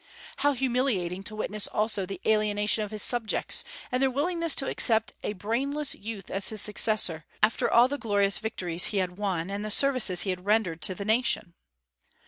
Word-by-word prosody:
How 290 +1 +1
humiliating 240 -9 -1
to 215 - -5
witness 215 -1 -2
also 210 -3 -1
the 195 - -7
alienation 210 0 +1
of 210 - -6
his 215 0 0
subjects, 240 -3 +1 0.3
and 250 +1 -1
their 270 - +3
willingness 335 +4 +1
to 270 - 0
accept 225 +1 +2
a - - -4
brainless 265 +9 -1
youth 205 -2 -8
as 195 0 +2
his 215 - -3
successor, 210 -6 +3 0.2
after 215 - +2
all 240 +1 +5
the 285 +2 -5
glorious 200 -3 +1
victories 180 -6 -3
he 205 - -2
had 180 0 -2
won, 190 -3 -2
and 200 +1 -4
the 215 - -4
services 220 -6 +3
he 195 - -1
had 180 0 -6
rendered 200 -5 0
to 185 - +3
the 200 - -7
nation! 220 -5 +1
215 Hz, 185 wpm, -26 LUFS, 195-245 Hz, 0.3 s, all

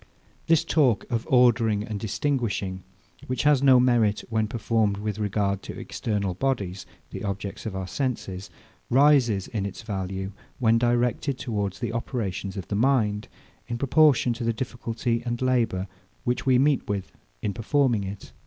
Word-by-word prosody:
This 165 0 +4
talk 135 -11 +2
of 115 -1 -1
ordering 115 -4 +4
and 105 -1 -5
distinguishing, 105 -5 -1 0.5
which 130 - -1
has 145 -2 +4
no 130 -2 +7
merit, 120 -4 +3
when 110 -1 +1
performed 110 -2 0
with 105 +1 -3
regard 100 -1 0
to - - -8
external 100 -4 -2
bodies, 95 -6 -2 0.2
the - - -6
objects 100 +1 -4
of 100 - -5
our 95 0 -3
senses, 100 -5 -3 0.4
rises 125 -7 +4
in 110 -5 -2
its 100 +3 -6
value, 95 -2 -4 0.3
when 115 -2 +3
directed 120 +3 +1
towards 105 -7 -3
the 120 -2 -3
operations 100 -5 -3
of 90 -5 -5
the - - -2
mind, 110 -3 +2 0.4
in 120 - -3
proportion 140 -1 +4
to 120 +1 -6
the 115 0 +1
difficulty 115 -1 -2
and 120 -1 -3
labour, 115 -7 +1 0.4
which 125 +2 -1
we 130 -1 +5
meet 140 -2 +2
with 100 -2 -3 0.3
in 105 - -1
performing 120 -1 +1
it. 100 0 -7
115 Hz, 155 wpm, -25 LUFS, 100-125 Hz, 0.5 s, no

